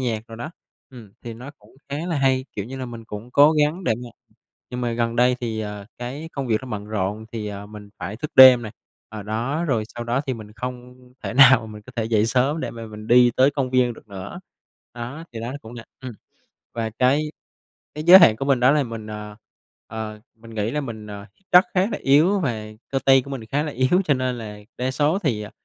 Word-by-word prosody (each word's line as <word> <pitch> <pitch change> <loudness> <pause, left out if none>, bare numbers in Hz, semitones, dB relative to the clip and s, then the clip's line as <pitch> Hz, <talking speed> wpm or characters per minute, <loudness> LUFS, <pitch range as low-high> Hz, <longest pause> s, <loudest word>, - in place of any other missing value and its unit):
nhạc 115 -4 -2
đồ 115 - -9
đó. 135 +7 -6 0.4
Ừm, 115 -6 -13
thì 115 -1 -7
nó 125 +5 -9
cũng - - -22
khá 140 - -3
là 165 -4 -1
hay, 130 -1 +2
kiểu 100 - -3
như 130 +5 -8
là, 130 -1 -5
mình 115 -1 -9
cũng 110 +3 -9
cố 145 +4 +6
gắng 155 +4 +1
để - - +2
mà - - -9 0.6
nhưng 125 0 -4
mà 120 -1 -1
gần 115 0 -1
đây 125 +1 +3
thì, 110 -2 -3
ờ, 105 -1 -6
cái 135 +6 -6
công 135 -2 -4
việc 110 -2 +1
nó 130 - -8
bận 105 -2 -5
rộn 105 +1 -3
thì, 110 -2 -4
ờ, 100 0 -7
mình 105 -1 -11
phải 95 +5 -5
thức 155 +5 -5
đêm 130 -2 +9
nè, 110 - -6 0.4
ờ, 110 -1 -8
đó, 120 +10 -2
rồi 120 -9 0
sau 120 0 -5
đó 120 +3 0
thì 130 - -1
mình 105 -2 -11
không 125 +2 -7 0.3
thể - - -4
nào 130 -4 +7
mình 105 -1 -10
có 125 +4 -14
thể 115 - 0
dậy 110 -1 +2
sớm 130 +7 +1
để - - -3
mà 115 -1 -8
mình 110 0 -10
đi 120 0 +6
tới 130 +2 +5
công 135 -3 -2
viên 125 -1 +2
được 110 - -16
nữa. 100 - -8 0.5
Đó, 125 +7 -7
thì 115 - -6
đó 120 +2 -4
cũng 110 +1 -11
là 115 -1 -9 0.2
ừm, 130 -2 -6 0.6
và 115 -1 -2
cái 130 +3 +4 0.8
cái 150 - -4
giới 180 +3 +10
hạn 110 -11 +6
của 135 - -3
mình 135 -3 +2
đó 130 +2 +5
là 150 -1 +3
mình, 115 -3 -7
ờ, 105 0 -7 0.5
ờ, 110 -1 -6 0.2
mình 115 0 -14
nghĩ 105 +2 -1
là 150 - -1
mình, 110 -5 -7
ờ, 100 -1 -8 0.3
chắc 180 +3 +7
khá 185 - +3
là - - -2
yếu 160 +9 +4
và 115 - -2 0.2
cơ 135 - 0
tay 135 -1 +6
của 140 - -10
mình 125 -5 -6
khá 140 +7 -1
là 150 - -4
yếu 130 +9 +2
cho 145 - +3
nên 130 -2 -2
là 105 -2 -8 0.2
đa 130 +1 -1
số 150 +7 +1
thì, 125 - -1
à, 105 - -8
120 Hz, 245 wpm, -22 LUFS, 110-135 Hz, 0.8 s, giới